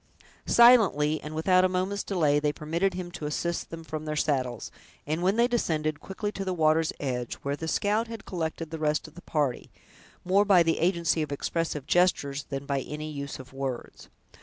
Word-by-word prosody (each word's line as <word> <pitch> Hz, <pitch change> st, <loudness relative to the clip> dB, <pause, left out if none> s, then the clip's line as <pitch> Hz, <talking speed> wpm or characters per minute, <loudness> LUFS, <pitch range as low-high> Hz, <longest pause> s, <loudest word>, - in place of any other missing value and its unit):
Silently, 195 Hz, -, +5 dB
and 150 Hz, +1 st, -7 dB
without 185 Hz, +3 st, +4 dB
a 185 Hz, -, +3 dB
moment's 185 Hz, +2 st, -1 dB
delay, 155 Hz, -7 st, +2 dB
they 150 Hz, 0 st, +1 dB
permitted 170 Hz, +6 st, -1 dB
him 180 Hz, -1 st, -5 dB
to 165 Hz, -4 st, -5 dB
assist 170 Hz, +3 st, -2 dB
them 165 Hz, 0 st, -8 dB
from 155 Hz, -1 st, -6 dB
their 155 Hz, 0 st, -3 dB
saddles, 130 Hz, -6 st, -1 dB, 0.3 s
and 155 Hz, +3 st, -2 dB
when 190 Hz, +3 st, +2 dB
they 235 Hz, +1 st, +4 dB
descended 155 Hz, -, -1 dB
quickly 205 Hz, +2 st, -4 dB
to 195 Hz, -, -5 dB
the 185 Hz, -1 st, -2 dB
water's 160 Hz, 0 st, +3 dB
edge, 125 Hz, -4 st, -3 dB
where 140 Hz, 0 st, -1 dB
the 160 Hz, +2 st, -6 dB
scout 210 Hz, +7 st, +1 dB
had 225 Hz, -2 st, -8 dB
collected 165 Hz, -2 st, -4 dB
the 160 Hz, -, -5 dB
rest 150 Hz, 0 st, 0 dB
of 155 Hz, -, -15 dB
the 175 Hz, -, -12 dB
party, 145 Hz, -8 st, -1 dB, 0.6 s
more 190 Hz, +3 st, +4 dB
by 195 Hz, -4 st, +5 dB
the 165 Hz, 0 st, +1 dB
agency 170 Hz, -2 st, +1 dB
of 150 Hz, -2 st, -3 dB
expressive 150 Hz, 0 st, -2 dB
gestures 145 Hz, -6 st, +1 dB
than 135 Hz, 0 st, -5 dB
by 140 Hz, -1 st, 0 dB
any 150 Hz, +3 st, -6 dB
use 140 Hz, -1 st, -5 dB
of 130 Hz, 0 st, -12 dB
words. 135 Hz, -3 st, -5 dB
160 Hz, 195 wpm, -27 LUFS, 150-185 Hz, 0.6 s, Silently